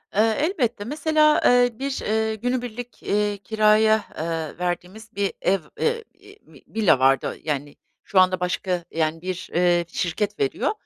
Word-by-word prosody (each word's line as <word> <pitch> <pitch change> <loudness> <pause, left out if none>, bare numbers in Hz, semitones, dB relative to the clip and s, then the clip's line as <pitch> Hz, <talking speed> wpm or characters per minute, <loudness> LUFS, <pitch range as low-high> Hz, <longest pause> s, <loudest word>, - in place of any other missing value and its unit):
Iıı, 220 +2 +4
elbette, 250 - -1
mesela, 305 +2 +3
ııı, 245 -2 +4
bir, 275 0 -3
ııı, 220 +1 0
günübirlik, 245 +1 -4
iii, 205 0 0
kiraya, 215 +1 +3
eee, 160 -1 -3
verdiğimiz 180 +6 -4
bir 200 -1 -1
ev, 195 +1 +2 0.2
eee, 465 0 0
iii, 400 +2 -18
v - - -17
villa 210 -11 +2
vardı. 135 0 +2
Yani, 145 -2 -3 0.3
şu 190 - +2
anda 185 0 +4
başka, 180 0 -2
yani, 160 0 -1
bir, 185 0 -5
ııı, 175 -1 +3
şirket 205 +3 -2
veriyor 140 - 0
210 Hz, 150 wpm, -23 LUFS, 180-240 Hz, 0.3 s, Iıı